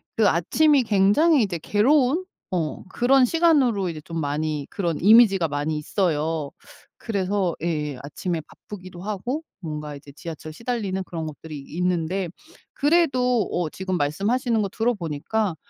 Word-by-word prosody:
그 220 -2 +4
아침이 280 - +3
굉장히 225 - +4
이제 175 -5 -2
괴로운 275 - +2 0.3
어 165 -4 -2
그런 255 +5 +4
시간으로 265 - +3
이제 160 -2 -6
좀 165 +2 -5
많이 150 0 -2
그런 170 -6 -2
이미지가 200 -4 +6
많이 145 +2 -2
있어요. 155 -2 -1 0.5
그래서 195 -4 -1
예예 150 -5 -2
아침에 165 +4 -3
바쁘기도 180 +2 -11
하고 215 - -3 0.2
뭔가 150 -3 -5
이제 140 0 -14
지하철 160 0 -8
시달리는 210 -3 -3
그런 165 -3 -5
것들이 155 0 -8
있는데 180 +4 -2 0.4
그래도 265 - +2
어 175 -3 -1
지금 185 +2 -3
말씀하시는 215 - 0
거 200 - -1
들어보니까 200 -3 -1
185 Hz, 325 characters per minute, -24 LUFS, 160-235 Hz, 0.5 s, 이미지가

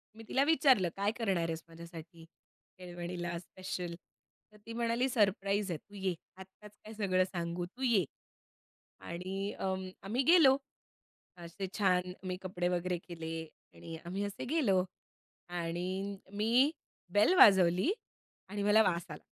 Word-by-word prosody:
मी 225 - -11
तिला 270 - +3
विचारलं 270 - +4
काय 200 +1 +1
करणार 195 -7 +1
आहेस 160 0 -4
माझ्यासाठी 165 0 -11 0.5
केळवणीला 175 -1 -5
स्पेशल. 180 -1 -6 0.6
तर 210 - -18
ती 230 - -7
म्हणाली 235 +2 +1
सरप्राईज 200 -3 +1
आहे 160 - -2
तू 205 +6 -18
ये. 190 -2 -1 0.2
आत्ताच 190 +2 -13
काय 215 +1 -9
सगळं 185 -3 +2
सांगू 175 -1 -3
तू 240 +9 -14
ये. 215 - +4 1.0
आणि 190 +4 -4
अ, 190 0 0 0.3
आम्ही 235 +7 0
गेलो. 300 -4 +7 0.8
असे 175 +3 -6
छान 180 -3 +2 0.2
मी 185 - -1
कपडे 180 -1 -2
वगैरे 180 0 0
केले 165 -2 -5 0.3
आणि 165 -1 -8
आम्ही 190 +4 -3
असे 200 - -5
गेलो. 240 - +2 0.7
आणि 180 +3 -3 0.2
मी 235 +8 +3 0.4
बेल 210 - +5
वाजवली 190 - +7 0.6
आणि 205 0 -3
मला 210 +2 +6
वास 170 -3 0
आला. 150 - -9
190 Hz, 135 wpm, -33 LUFS, 175-210 Hz, 1.0 s, गेलो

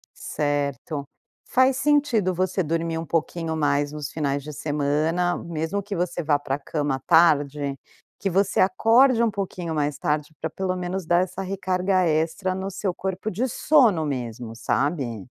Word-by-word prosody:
Certo. 145 0 -2 0.4
Faz 260 0 +3
sentido 265 -10 +2
você 185 +1 0
dormir 165 +1 -1
um 165 - -4
pouquinho 165 0 -1
mais 145 -1 +1
nos 150 -1 -5
finais 140 -3 -1
de 150 - -7
semana, 150 +4 0
mesmo 170 +4 -3
que 205 0 -5
você 175 -1 -2
vá 145 -1 +3
para 135 -1 -2
a - - -8
cama 145 -3 -2
tarde, 145 -4 +3 0.4
que 195 - -1
você 195 +2 +1
acorde 230 +6 +4
um 235 - +3
pouquinho 180 -4 -4
mais 145 -1 -1
tarde, 150 +1 -1
pra 160 - -3
pelo 185 +2 -2
menos 180 0 -3
dar 175 +1 +3
essa 185 +1 -6
recarga 185 -1 0
extra 165 +4 0
no 190 +1 -4
seu 190 -1 -2
corpo 190 +3 -3
de 230 +7 -1
sono 230 - +3
mesmo, 120 -4 -4
sabe. 125 - -1
165 Hz, 160 wpm, -24 LUFS, 145-190 Hz, 0.4 s, acorde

